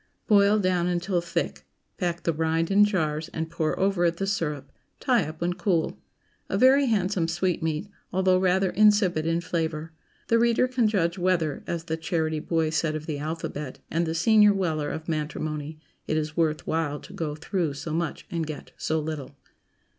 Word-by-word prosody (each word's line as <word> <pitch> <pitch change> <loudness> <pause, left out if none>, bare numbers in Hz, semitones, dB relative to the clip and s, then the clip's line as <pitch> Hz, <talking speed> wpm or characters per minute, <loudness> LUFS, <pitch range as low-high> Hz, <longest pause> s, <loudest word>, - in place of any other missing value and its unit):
Boil 205 0 +5
down 185 -3 +1
until 180 0 0
thick; 170 - -3 0.3
pack 175 -3 -2
the 165 - +1
rind 160 +2 0
in 205 +1 +6
jars 160 -5 -1
and 160 0 -3
pour 160 -2 -1
over 195 -2 +2
it 170 0 +1
the 195 - -1
syrup. 160 -8 -2 0.3
Tie 250 - +2
up 155 +1 -9
when 175 +1 +1
cool. 175 -2 0 0.5
A - - 0
very 270 +2 +5
handsome 190 -6 +1
sweetmeat, 165 -1 -1 0.2
although 185 0 +3
rather 185 0 +2
insipid 205 -6 +3
in 165 +1 +1
flavor. 160 -2 -3 0.4
The 230 - +3
reader 235 +2 +3
can 250 -3 +2
judge 180 -4 0
whether, 175 -4 0
as 170 -1 -3
the 160 -1 -3
charity 160 -2 -1
boy 160 0 0
said 155 0 0
of 155 0 -5
the 150 -3 -3
alphabet, 150 -2 -5
and 165 +1 0
the 160 - -2
senior 210 +4 +5
Weller 160 -6 -1
of 160 +2 -6
matrimony, 155 -1 -3 0.3
it 155 - 0
is 155 0 -2
worth 155 -2 0
while 155 -2 -1
to 190 - -13
go 160 -6 -3
through 160 -2 -2
so 155 +2 -5
much 165 -1 -2
and 165 -2 -2
get 155 -2 -7
so 160 0 0
little. 150 -3 -5
165 Hz, 180 wpm, -26 LUFS, 155-190 Hz, 0.5 s, in